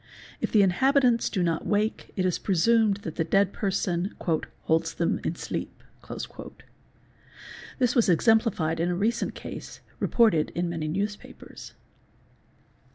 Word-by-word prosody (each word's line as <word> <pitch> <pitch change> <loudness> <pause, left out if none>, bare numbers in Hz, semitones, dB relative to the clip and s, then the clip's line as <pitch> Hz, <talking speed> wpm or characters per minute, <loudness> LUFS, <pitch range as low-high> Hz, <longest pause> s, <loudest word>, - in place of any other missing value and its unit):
If - - -2
the 210 -2 +5
inhabitants 250 +5 +3
do 185 - -1
not 165 -2 -1
wake 210 +1 -1
it 185 - 0
is 180 - 0
presumed 205 +2 +2
that 160 - -6
the 165 - +2
dead 195 +4 +2
person 190 -2 -1 0.5
"holds 165 +1 +1
them 170 - 0
in 165 - -2
sleep". - - -6 1.9
This 250 -3 +2
was 235 -7 +3
exemplified 180 -3 +2
in 170 +2 +1
a 175 - 0
recent 215 +6 -1
case, - - -8 0.2
reported 215 -10 +3
in 175 0 -1
many 165 -2 -3
newspapers. 205 +6 -6
195 Hz, 130 wpm, -26 LUFS, 170-220 Hz, 1.9 s, the